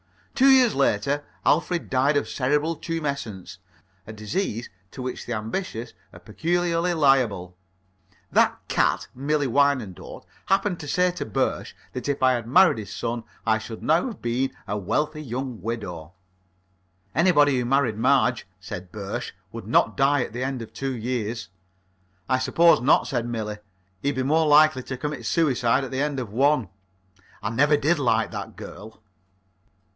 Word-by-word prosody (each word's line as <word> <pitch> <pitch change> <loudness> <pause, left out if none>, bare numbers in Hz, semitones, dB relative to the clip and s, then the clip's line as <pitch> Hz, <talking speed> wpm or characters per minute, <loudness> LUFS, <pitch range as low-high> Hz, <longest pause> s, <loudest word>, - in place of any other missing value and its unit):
Two 270 +1 +5
years 255 -4 +6
later 140 +2 +1 0.2
Alfred 170 +2 +1
died 135 +3 +3
of - - -1
cerebral 150 +5 0
tumescence 140 - -5 0.5
a 110 - -7
disease 115 - -3 0.2
to - - -13
which 125 0 -5
the 120 - -2
ambitious 115 - -4 0.2
are - - -13
peculiarly 175 +1 0
liable. 120 - +2 0.8
That - - +3
cat, - - +1
Millie 145 +3 0
Wyandotte, 130 -7 0 0.2
happened 195 -2 +1
to 145 - -7
say 180 +4 +2
to 180 - -5
Birsch 110 - -1 0.2
that 125 +2 -4
if 140 -1 -1
I 130 - +6
had 120 -2 -3
married 135 0 +5
his 105 -2 -8
son 115 +1 -3 0.2
I 110 -1 +2
should 110 0 -8
now 165 +9 +2
have 225 -7 -8
been 120 +3 0 0.2
a 105 - -2
wealthy 150 - -1
young 130 -3 -5
widow. 90 -8 -5 1.0
"Anybody 145 -6 +4
who 125 - -1
married 125 -4 +1
Marge," 125 -4 +2
said 90 -1 -8
Birsch, 105 +3 -5 0.2
"would 115 -3 -8
not 115 -1 +3
die 140 -1 +3
at 115 - -8
the 125 +2 -3
end 130 -2 -3
of 110 - -13
two 135 -1 -3
years." 115 -5 -3 0.8
"I 130 0 +2
suppose 165 +2 +4
not," 135 +5 +4
said 120 -3 -2
Millie. 110 -3 -4 0.4
"He'd 140 +4 0
be 130 - -1
more 155 +4 +2
likely 150 -2 +5
to 130 +1 -6
commit 135 -4 -4
suicide 135 -6 +2
at 135 - -6
the 130 +1 -1
end 145 -2 -1
of 115 -5 -6
one." 135 -3 +2 0.7
I 105 - -1
never 145 +5 +3
did 155 +3 +1
like 115 -4 +1
that - - -6
girl. 110 +1 -11
130 Hz, 160 wpm, -24 LUFS, 115-150 Hz, 1.0 s, years